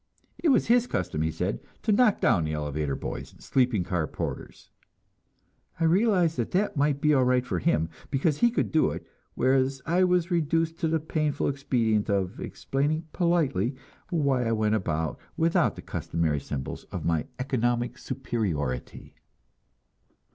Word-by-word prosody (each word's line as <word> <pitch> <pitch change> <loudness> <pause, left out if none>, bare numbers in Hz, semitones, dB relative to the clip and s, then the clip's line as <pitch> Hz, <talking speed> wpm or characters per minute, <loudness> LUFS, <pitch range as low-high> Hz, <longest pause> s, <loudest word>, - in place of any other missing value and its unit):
It 330 - +2
was 265 - +4
his 240 +1 +4
custom, 80 - -2
he 80 - +1
said, - - -2 0.2
to - - +2
knock 215 0 +4
down 85 - +3
the 75 - -2
elevator 75 -1 -2
boys - - -6
and - - -20
sleeping 125 -7 +2
car 85 -4 -1
porters. - - -6 1.1
I - - 0
answered 180 -1 +3
that 120 - -2
that 205 -2 0
might 145 -1 +1
be 150 -1 +4
all 130 -3 +4
right 125 0 +2
for 90 -7 -2
him, 80 0 +1 0.2
because 145 +1 +1
he 240 - +5
could 235 - -1
do 155 - +3
it; - - -6 0.3
whereas 130 +1 +2
I 175 +3 +3
was 180 -1 +1
reduced 165 0 +1
to 165 - +1
the 160 0 +1
painful 155 -1 -1
expedient 115 -6 0
of 100 +1 -1
explaining 155 +4 -2
politely 150 - +1 0.3
why 140 -7 +1
I 115 - +1
went 110 -1 +1
about 80 -6 -1 0.2
without 165 0 +2
the - - -9
customary 80 -3 -1
symbols 70 -1 -5
of - - -6
my 80 -2 0
economic 120 -2 -1
superiority. 85 - -3
130 Hz, 160 wpm, -27 LUFS, -, 1.1 s, he